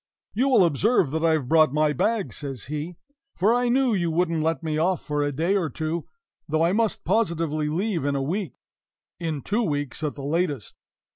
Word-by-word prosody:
"You 255 Hz, +6 st, +2 dB
will 240 Hz, -8 st, +5 dB
observe 170 Hz, -, +2 dB
that 160 Hz, +1 st, -2 dB
I 165 Hz, -1 st, +4 dB
have 150 Hz, -5 st, -1 dB
brought 155 Hz, -1 st, +4 dB
my 150 Hz, -1 st, +3 dB
bag," 215 Hz, -, 0 dB
says 135 Hz, -6 st, -6 dB
he, 150 Hz, +5 st, -5 dB, 0.4 s
"for 205 Hz, +6 st, +3 dB
I 245 Hz, 0 st, +1 dB
knew 255 Hz, -1 st, +3 dB
you 175 Hz, -4 st, 0 dB
wouldn't 165 Hz, -1 st, 0 dB
let 160 Hz, -2 st, -1 dB
me 155 Hz, -1 st, -1 dB
off 180 Hz, +2 st, +1 dB
for 150 Hz, 0 st, -1 dB
a 145 Hz, 0 st, 0 dB
day 165 Hz, +8 st, 0 dB
or 175 Hz, -6 st, 0 dB
two 160 Hz, +4 st, -3 dB, 0.4 s
though 155 Hz, +2 st, +2 dB
I 170 Hz, +2 st, +2 dB
must 225 Hz, 0 st, 0 dB
positively 165 Hz, -7 st, 0 dB
leave 180 Hz, +1 st, -1 dB
in 140 Hz, 0 st, 0 dB
a 135 Hz, -, 0 dB
week 180 Hz, +5 st, -3 dB, 0.6 s
in 160 Hz, -4 st, -3 dB
two 215 Hz, +4 st, 0 dB
weeks, 145 Hz, -, -2 dB
at 150 Hz, -, -2 dB
the 140 Hz, -, -8 dB
latest. 145 Hz, -, -1 dB
165 Hz, 205 wpm, -25 LUFS, 150-190 Hz, 0.6 s, will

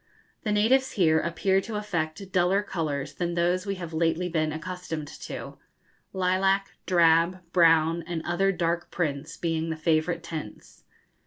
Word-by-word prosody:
The 215 Hz, -, -2 dB
natives 255 Hz, +6 st, +3 dB
here 160 Hz, -5 st, +3 dB
appear 190 Hz, +4 st, +1 dB
to 215 Hz, +2 st, -6 dB
affect 185 Hz, -3 st, -3 dB
duller 185 Hz, +3 st, +2 dB
colours 150 Hz, -7 st, -3 dB
than 175 Hz, +2 st, -2 dB
those 180 Hz, +3 st, +1 dB
we 200 Hz, -, -1 dB
have 170 Hz, -3 st, -7 dB
lately 165 Hz, +2 st, +1 dB
been 155 Hz, -2 st, 0 dB
accustomed 160 Hz, -1 st, -5 dB
to, -, -, -8 dB, 0.5 s
lilac, 190 Hz, +1 st, +1 dB, 0.2 s
drab, 170 Hz, 0 st, +4 dB
brown, 165 Hz, -1 st, +4 dB
and 170 Hz, -2 st, -3 dB
other 195 Hz, +3 st, +2 dB
dark 170 Hz, -1 st, -1 dB
prints 150 Hz, -2 st, -3 dB
being 165 Hz, -1 st, -1 dB
the 160 Hz, -, -3 dB
favourite 165 Hz, +1 st, +1 dB
tints. 155 Hz, -11 st, -8 dB
170 Hz, 145 wpm, -27 LUFS, 160-185 Hz, 0.5 s, drab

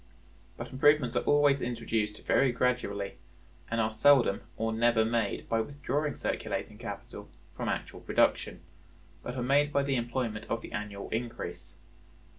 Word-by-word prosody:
But 120 Hz, -, -7 dB
improvements 140 Hz, -2 st, +3 dB
are -, -, +3 dB
always 145 Hz, -2 st, +4 dB
introduced 115 Hz, -3 st, -2 dB
very 135 Hz, -, +4 dB
gradually, 120 Hz, -5 st, -1 dB, 0.5 s
and 115 Hz, -, -1 dB
are 110 Hz, -1 st, +1 dB
seldom 115 Hz, -2 st, +4 dB, 0.2 s
or 115 Hz, 0 st, -1 dB
never 115 Hz, 0 st, +3 dB
made 115 Hz, -2 st, -1 dB
by 115 Hz, 0 st, +1 dB
withdrawing 145 Hz, +3 st, -2 dB
circulating -, -, -3 dB
capital -, -, -8 dB, 0.3 s
from -, -, -3 dB
actual -, -, -3 dB
production, 90 Hz, -, +1 dB, 0.6 s
but 125 Hz, -, -6 dB
are 125 Hz, -, -2 dB
made 145 Hz, +3 st, +3 dB
by 140 Hz, -1 st, +2 dB
the 135 Hz, -2 st, 0 dB
employment 120 Hz, -2 st, -2 dB
of 115 Hz, -, -2 dB
the -, -, -9 dB
annual 105 Hz, -1 st, -5 dB
increase. 85 Hz, -7 st, -5 dB
120 Hz, 145 wpm, -30 LUFS, 110-135 Hz, 0.6 s, always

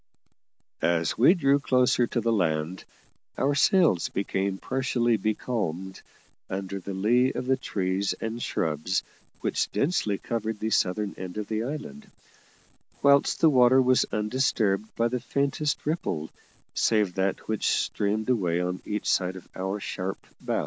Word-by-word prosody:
As 85 Hz, -1 st, +1 dB
we 150 Hz, -, +6 dB
drew 140 Hz, -4 st, +3 dB
closer 125 Hz, -3 st, +2 dB
to 120 Hz, -, -1 dB
the 115 Hz, +1 st, +1 dB
land, 85 Hz, -3 st, -1 dB, 0.5 s
our 140 Hz, +2 st, +2 dB
sails 145 Hz, -, +3 dB
became 95 Hz, 0 st, -2 dB
partially 125 Hz, -1 st, 0 dB
becalmed 105 Hz, -5 st, -3 dB, 0.5 s
under 95 Hz, +1 st, -4 dB
the 95 Hz, +1 st, -6 dB
lee 120 Hz, +7 st, +3 dB
of -, -, -4 dB
the 130 Hz, +1 st, +3 dB
trees 95 Hz, -5 st, -1 dB
and 115 Hz, +1 st, -5 dB
shrubs 80 Hz, +1 st, -1 dB, 0.4 s
which -, -, -1 dB
densely 140 Hz, -, 0 dB
covered 110 Hz, -1 st, -3 dB
the 110 Hz, +1 st, -2 dB
southern 100 Hz, +2 st, +1 dB
end 90 Hz, +1 st, -6 dB
of 105 Hz, -, -2 dB
the 110 Hz, 0 st, -2 dB
island, 155 Hz, -, -7 dB, 0.9 s
whilst 140 Hz, 0 st, +4 dB
the 160 Hz, -, +7 dB
water 130 Hz, 0 st, +6 dB
was 130 Hz, 0 st, +3 dB
undisturbed 105 Hz, -2 st, 0 dB
by 115 Hz, -, +2 dB
the 125 Hz, +1 st, -2 dB
faintest 140 Hz, +2 st, -1 dB
ripple 115 Hz, -, -2 dB, 0.4 s
save 105 Hz, -5 st, +2 dB
that 95 Hz, +1 st, -1 dB
which 110 Hz, -2 st, -1 dB
streamed 105 Hz, +1 st, 0 dB
away 90 Hz, -9 st, +1 dB
on 90 Hz, +1 st, -2 dB
each 105 Hz, 0 st, -3 dB
side 90 Hz, 0 st, +1 dB
of 95 Hz, -, -11 dB
our 95 Hz, +2 st, -3 dB
sharp 95 Hz, -1 st, -4 dB, 0.2 s
bow. -, -, -1 dB
110 Hz, 145 wpm, -26 LUFS, 95-130 Hz, 0.9 s, the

